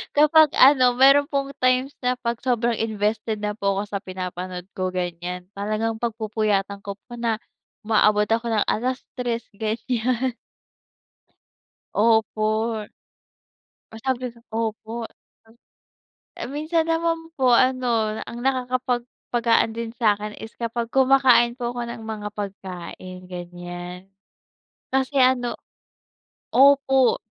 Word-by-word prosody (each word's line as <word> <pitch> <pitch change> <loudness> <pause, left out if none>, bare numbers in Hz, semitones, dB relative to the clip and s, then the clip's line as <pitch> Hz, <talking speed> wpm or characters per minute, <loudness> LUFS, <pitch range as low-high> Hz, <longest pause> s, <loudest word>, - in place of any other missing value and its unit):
kapag 305 +1 +6
ano, 255 -2 +6
meron 275 +2 +6
pong 275 -1 -2
times 255 +2 +2
na 250 0 +1
pag 235 -2 -3
sobrang 240 -2 0
invested 215 0 -1
na 210 - 0
po 200 -2 0
ako 195 - 0
sa 200 - -1
pinapanood 185 -1 -6
ko, 185 -1 -1
ganyan, 180 0 -4
talagang 215 +2 -2
pagpupuyatan 215 -3 -1
ko 200 0 -6
po 240 +4 -15
na 230 -1 +1 0.5
umaabot 210 -1 +4
ako 230 +1 +1
ng 220 -3 +2
3:00 245 0 -3
ganyan. 235 +4 -1 1.7
Opo, 220 -1 +3 1.5
masabi, 255 +3 -2 0.3
opo. 225 +1 -3 1.4
Minsan 310 +4 -1
naman 330 0 0
po, 260 -2 +3
ano, 240 -3 +2
ang 235 - -8
nakakapagpapagaan 245 -3 0
din 230 -1 -4
sa'kin 210 -3 0
is 220 - -9
kapag 235 0 -3
kumakain 260 -1 +4
po 240 0 -3
ako 240 - -2
ng 230 - -8
mga 215 -2 -4
pagkain, 185 -2 -7
ganyan, 175 0 -8 0.9
kasi 265 +1 +1
ano, 255 -2 +3 1.0
opo 270 -1 +5
230 Hz, 110 wpm, -23 LUFS, 210-255 Hz, 1.7 s, kapag